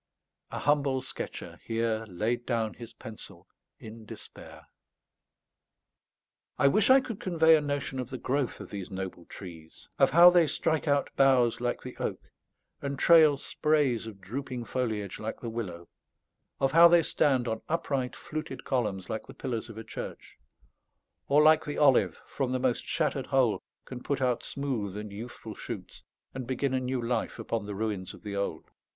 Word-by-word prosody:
A -, -, -5 dB
humble 140 Hz, -2 st, +1 dB
sketcher -, -, -7 dB
here 115 Hz, -1 st, -1 dB
laid 110 Hz, +6 st, -2 dB
down 115 Hz, -3 st, 0 dB
his 120 Hz, -2 st, -10 dB
pencil 110 Hz, -1 st, -11 dB, 0.3 s
in 110 Hz, +1 st, -10 dB
despair. 110 Hz, -, -12 dB, 1.9 s
I 140 Hz, -, +4 dB
wish 210 Hz, -, +3 dB
I 265 Hz, +1 st, +8 dB
could 225 Hz, -5 st, -6 dB
convey 165 Hz, -3 st, +5 dB
a 155 Hz, -, +2 dB
notion 145 Hz, -2 st, -3 dB
of 125 Hz, -1 st, -4 dB
the 130 Hz, -, -5 dB
growth 130 Hz, -1 st, -1 dB
of -, -, -9 dB
these 100 Hz, -3 st, -6 dB
noble 95 Hz, -2 st, -6 dB
trees; 80 Hz, -4 st, -12 dB
of -, -, +6 dB
how 175 Hz, +2 st, +9 dB
they 175 Hz, -3 st, +5 dB
strike 160 Hz, +1 st, 0 dB
out 140 Hz, -1 st, +2 dB
boughs 130 Hz, -4 st, +4 dB
like 120 Hz, 0 st, -2 dB
the 125 Hz, -, -8 dB
oak, -, -, -4 dB, 0.5 s
and 140 Hz, -1 st, -3 dB
trail 155 Hz, -2 st, +6 dB
sprays 140 Hz, -6 st, +1 dB
of 105 Hz, -3 st, -9 dB
drooping 125 Hz, +4 st, -5 dB
foliage 110 Hz, -7 st, -3 dB
like 110 Hz, +1 st, -5 dB
the 115 Hz, -, -5 dB
willow; 90 Hz, -7 st, -5 dB, 0.7 s
of 135 Hz, -, +2 dB
how 170 Hz, +1 st, +9 dB
they 170 Hz, -1 st, +5 dB
stand 130 Hz, -5 st, +2 dB
on 110 Hz, -1 st, -2 dB
upright 140 Hz, -6 st, -1 dB
fluted 155 Hz, +1 st, -6 dB
columns 105 Hz, -8 st, -1 dB
like 110 Hz, -, -4 dB
the -, -, -11 dB
pillars 115 Hz, -1 st, -4 dB
of 110 Hz, -, -10 dB
a 110 Hz, -, -6 dB
church; 110 Hz, -, -8 dB, 0.9 s
or 145 Hz, +2 st, +5 dB
like 155 Hz, +1 st, +6 dB
the 145 Hz, -, -5 dB
olive, 140 Hz, -4 st, +4 dB
from 135 Hz, -3 st, -2 dB
the 130 Hz, -, 0 dB
most 125 Hz, -2 st, 0 dB
shattered 145 Hz, -5 st, -1 dB
hole 130 Hz, -5 st, +2 dB, 0.2 s
can 125 Hz, -1 st, -8 dB
put 140 Hz, +1 st, -2 dB
out 125 Hz, -2 st, +1 dB
smooth 120 Hz, -9 st, -3 dB
and 105 Hz, -1 st, -6 dB
youthful 110 Hz, +1 st, -8 dB
shoots, -, -, -8 dB, 0.3 s
and 130 Hz, -2 st, -5 dB
begin 130 Hz, +1 st, -1 dB
a 130 Hz, -, +2 dB
new 130 Hz, 0 st, -2 dB
life 115 Hz, -1 st, -1 dB
upon 110 Hz, -3 st, -3 dB
the 105 Hz, -, -5 dB
ruins 105 Hz, -3 st, -3 dB
of -, -, -18 dB
the 105 Hz, -1 st, -5 dB
old. 100 Hz, -5 st, -3 dB
125 Hz, 170 wpm, -29 LUFS, 110-140 Hz, 1.9 s, how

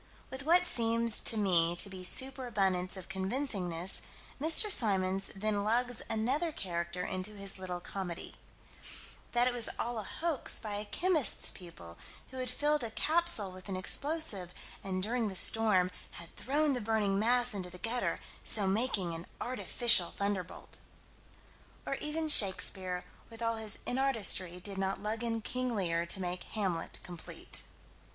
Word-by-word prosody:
With 265 Hz, +2 st, -7 dB
what 350 Hz, +2 st, +6 dB
seems 230 Hz, -1 st, +3 dB
to 225 Hz, -, +6 dB
me 175 Hz, -4 st, +2 dB
to 175 Hz, -, +3 dB
be 190 Hz, -2 st, -9 dB
super 260 Hz, +6 st, +3 dB
abundance 190 Hz, -4 st, -1 dB
of 185 Hz, -, -9 dB
convincingness, 190 Hz, -4 st, -3 dB, 0.4 s
Mr. 325 Hz, +7 st, +4 dB
Symons 195 Hz, -, +2 dB
then 205 Hz, 0 st, -2 dB
lugs 240 Hz, +2 st, 0 dB
another 260 Hz, +10 st, -1 dB
character 175 Hz, -, -4 dB
into 185 Hz, +3 st, -5 dB
his 195 Hz, -1 st, -4 dB
little 180 Hz, -1 st, -5 dB
comedy: 180 Hz, -1 st, -6 dB, 1.0 s
That 240 Hz, 0 st, +2 dB
it 250 Hz, -, 0 dB
was 240 Hz, -2 st, +2 dB
all 235 Hz, -1 st, -3 dB
a -, -, -5 dB
hoax 320 Hz, -, +1 dB
by 210 Hz, -2 st, -4 dB
a 210 Hz, -, -5 dB
chemist's 335 Hz, -, 0 dB
pupil, 85 Hz, -, -13 dB, 0.3 s
who 260 Hz, -, -10 dB
had 255 Hz, -1 st, -3 dB
filled 295 Hz, +2 st, 0 dB
a 230 Hz, -, -4 dB
capsule 315 Hz, -, +2 dB
with 185 Hz, +2 st, -12 dB
an 190 Hz, -, -3 dB
explosive, 205 Hz, -, 0 dB, 0.3 s
and 185 Hz, -1 st, -3 dB
"during 230 Hz, +1 st, -1 dB
the 195 Hz, -, -5 dB
storm 190 Hz, -3 st, +4 dB, 0.2 s
had 170 Hz, 0 st, -9 dB
thrown 290 Hz, +2 st, 0 dB
the 250 Hz, -, -3 dB
burning 210 Hz, -2 st, 0 dB
mass 245 Hz, +2 st, +2 dB
into 185 Hz, -3 st, -5 dB
the 180 Hz, -, -10 dB
gutter, 235 Hz, +6 st, -2 dB, 0.2 s
so 205 Hz, -3 st, +6 dB
making 195 Hz, -3 st, -1 dB
an 165 Hz, +1 st, -7 dB
artificial 240 Hz, -6 st, +4 dB
thunderbolt." 200 Hz, -3 st, -4 dB, 1.1 s
Or -, -, -3 dB
even 310 Hz, +1 st, -2 dB
Shakespeare, 190 Hz, -7 st, +4 dB, 0.2 s
with 230 Hz, 0 st, -9 dB
all 230 Hz, 0 st, -1 dB
his 220 Hz, -2 st, -3 dB
inartistry, 220 Hz, -9 st, +1 dB
did 195 Hz, +1 st, -6 dB
not 195 Hz, +1 st, -3 dB
lug 220 Hz, +2 st, -3 dB
in 225 Hz, -1 st, -2 dB
King 255 Hz, 0 st, -2 dB
Lear 170 Hz, -4 st, -1 dB
to 190 Hz, -, +2 dB
make 180 Hz, -1 st, -4 dB
Hamlet 190 Hz, -6 st, -3 dB
complete. 175 Hz, -2 st, -8 dB
210 Hz, 155 wpm, -31 LUFS, 185-245 Hz, 1.1 s, what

